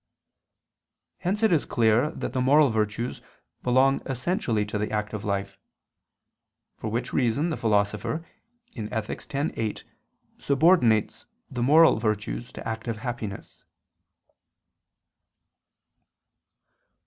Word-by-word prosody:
Hence 195 Hz, +4 st, -1 dB
it 220 Hz, -, +4 dB
is 160 Hz, -4 st, +3 dB
clear 115 Hz, +4 st, +2 dB
that -, -, -5 dB
the 130 Hz, -, 0 dB
moral 145 Hz, +3 st, +5 dB
virtues 110 Hz, +2 st, -2 dB, 0.4 s
belong 130 Hz, +2 st, +3 dB
essentially 130 Hz, -, -1 dB
to 105 Hz, 0 st, -3 dB
the 105 Hz, -, -1 dB
active 105 Hz, -1 st, -3 dB
life; 100 Hz, -1 st, -3 dB, 1.2 s
for -, -, -6 dB
which 120 Hz, +3 st, -3 dB
reason 135 Hz, +7 st, +1 dB
the -, -, -1 dB
Philosopher 105 Hz, +9 st, 0 dB, 0.5 s
(Ethic. 110 Hz, -2 st, -5 dB
x, 145 Hz, +3 st, +1 dB
8) 110 Hz, -2 st, -3 dB, 0.6 s
subordinates 140 Hz, -, +3 dB, 0.2 s
the 125 Hz, -2 st, -3 dB
moral 155 Hz, +5 st, +6 dB
virtues 110 Hz, +2 st, -2 dB
to -, -, -7 dB
active 110 Hz, 0 st, -4 dB
happiness. 110 Hz, -4 st, -6 dB
120 Hz, 100 wpm, -26 LUFS, 105-140 Hz, 1.2 s, moral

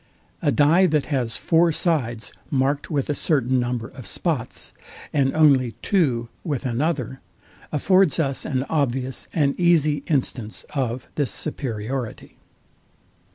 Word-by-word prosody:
A -, -, +2 dB
dye 160 Hz, +9 st, +5 dB
that 150 Hz, -3 st, +1 dB
has 120 Hz, -4 st, 0 dB
four 165 Hz, 0 st, +3 dB
sides 130 Hz, -, -1 dB, 0.2 s
marked 140 Hz, +1 st, 0 dB
with 145 Hz, -5 st, -1 dB
a 150 Hz, -, 0 dB
certain 130 Hz, -4 st, +1 dB
number 120 Hz, -2 st, -2 dB
of 130 Hz, -3 st, -10 dB
spots, 145 Hz, -9 st, -3 dB, 0.4 s
and 135 Hz, -2 st, +2 dB
only 135 Hz, -6 st, +4 dB
two 130 Hz, -, +1 dB, 0.2 s
with 145 Hz, -6 st, -3 dB
another, 130 Hz, 0 st, -1 dB, 0.5 s
affords 185 Hz, +2 st, +3 dB
us 140 Hz, -4 st, 0 dB
an 130 Hz, -3 st, -1 dB
obvious 135 Hz, -4 st, -1 dB
and 140 Hz, -3 st, +2 dB
easy 160 Hz, -4 st, +4 dB
instance 125 Hz, -7 st, -2 dB
of 130 Hz, -3 st, -2 dB
this 145 Hz, -3 st, 0 dB
superiority. 125 Hz, -4 st, -4 dB
140 Hz, 125 wpm, -23 LUFS, 125-155 Hz, 0.5 s, dye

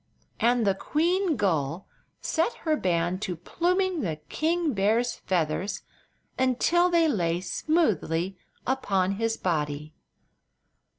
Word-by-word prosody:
And 240 Hz, 0 st, +3 dB
the 195 Hz, -, +4 dB
queen 340 Hz, -, +1 dB
gull 170 Hz, -, -1 dB, 0.3 s
set 330 Hz, +9 st, 0 dB
her 310 Hz, -1 st, +3 dB
band 175 Hz, -, 0 dB
to 180 Hz, -4 st, -2 dB
pluming 355 Hz, -, 0 dB
the 165 Hz, -7 st, -1 dB
king 325 Hz, -1 st, 0 dB
bear's 220 Hz, +4 st, +2 dB
feathers 175 Hz, +1 st, -1 dB, 0.6 s
until 295 Hz, +8 st, +3 dB
they 335 Hz, -2 st, +4 dB
lay 175 Hz, -, +1 dB
smoothly 190 Hz, -, 0 dB, 0.3 s
upon 195 Hz, -8 st, +1 dB
his 225 Hz, 0 st, 0 dB
body. 150 Hz, -3 st, -2 dB
215 Hz, 110 wpm, -27 LUFS, -, 0.6 s, the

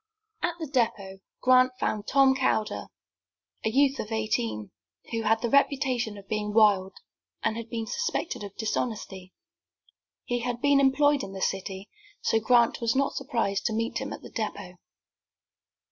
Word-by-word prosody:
At 345 Hz, -1 st, -1 dB
the 320 Hz, -, -3 dB
depot 225 Hz, -8 st, -1 dB, 0.2 s
Grant 255 Hz, 0 st, +5 dB
found 210 Hz, -1 st, -2 dB
Tom 270 Hz, -1 st, +5 dB
Calder, 215 Hz, -4 st, 0 dB, 0.8 s
a -, -, +1 dB
youth 275 Hz, +3 st, +3 dB
of 215 Hz, -, -5 dB
eighteen, 115 Hz, -, -2 dB, 0.4 s
who 230 Hz, -1 st, -1 dB
had 225 Hz, +1 st, +1 dB
the 235 Hz, -, +1 dB
reputation 260 Hz, -6 st, +2 dB
of 195 Hz, -1 st, -13 dB
being 210 Hz, 0 st, -2 dB
wild, 200 Hz, -4 st, +4 dB, 0.5 s
and 220 Hz, -, +1 dB
had 230 Hz, 0 st, -6 dB
been 225 Hz, -1 st, -3 dB
suspected 325 Hz, -, -2 dB
of 200 Hz, -1 st, -8 dB
dishonesty. 210 Hz, -4 st, -3 dB, 0.9 s
He 245 Hz, 0 st, -1 dB
had 240 Hz, 0 st, -3 dB
been 285 Hz, +1 st, +4 dB
employed 280 Hz, +1 st, +4 dB
in 195 Hz, -, -7 dB
the 190 Hz, -, -7 dB
city, 195 Hz, +1 st, -3 dB, 0.3 s
so -, -, +1 dB
that 220 Hz, -, -16 dB
Grant 240 Hz, -1 st, +4 dB
was 230 Hz, 0 st, +1 dB
not 275 Hz, +1 st, +1 dB
surprised 230 Hz, -8 st, -1 dB
to 220 Hz, -, -2 dB
meet 225 Hz, +1 st, -1 dB
him -, -, -5 dB
at -, -, -8 dB
the -, -, -11 dB
depot. 200 Hz, -5 st, -5 dB
225 Hz, 160 wpm, -27 LUFS, 210-260 Hz, 0.9 s, Grant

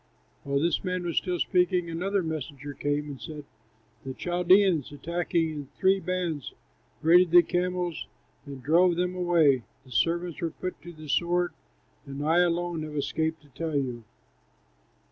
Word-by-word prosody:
While 140 Hz, 0 st, -1 dB
this 165 Hz, +1 st, +1 dB
man 180 Hz, -1 st, -2 dB
was 170 Hz, -2 st, -3 dB
still 180 Hz, -2 st, 0 dB
speaking, 180 Hz, -1 st, +1 dB
another 185 Hz, +4 st, -1 dB
messenger 145 Hz, -3 st, -5 dB
came 145 Hz, +1 st, -1 dB
and 140 Hz, -5 st, -8 dB
said, 150 Hz, +5 st, -8 dB, 0.6 s
"The 130 Hz, -1 st, -6 dB
Chaldeans, 180 Hz, -2 st, +3 dB
attacking 165 Hz, +2 st, -1 dB
in 145 Hz, -3 st, -6 dB
three 195 Hz, +1 st, +3 dB
bands, 180 Hz, -6 st, -3 dB, 0.5 s
raided 175 Hz, +2 st, +6 dB
the 175 Hz, +1 st, +7 dB
camels 180 Hz, 0 st, -2 dB, 0.4 s
and 135 Hz, -2 st, -8 dB
drove 175 Hz, +3 st, +4 dB
them 180 Hz, +1 st, 0 dB
away; 165 Hz, -7 st, +3 dB, 0.2 s
the 130 Hz, -, -17 dB
servants 170 Hz, +7 st, 0 dB
were 165 Hz, -, 0 dB
put 185 Hz, +3 st, -6 dB
to 175 Hz, -, -9 dB
the 155 Hz, -2 st, -12 dB
sword, 175 Hz, +4 st, +1 dB, 0.5 s
and 140 Hz, +1 st, -5 dB
I 165 Hz, +3 st, +4 dB
alone 175 Hz, -1 st, +1 dB
have 155 Hz, -1 st, -6 dB
escaped 160 Hz, +2 st, -2 dB
to 145 Hz, -, -21 dB
tell 155 Hz, +3 st, -4 dB
you." 125 Hz, -4 st, -2 dB
165 Hz, 155 wpm, -27 LUFS, 145-180 Hz, 0.6 s, the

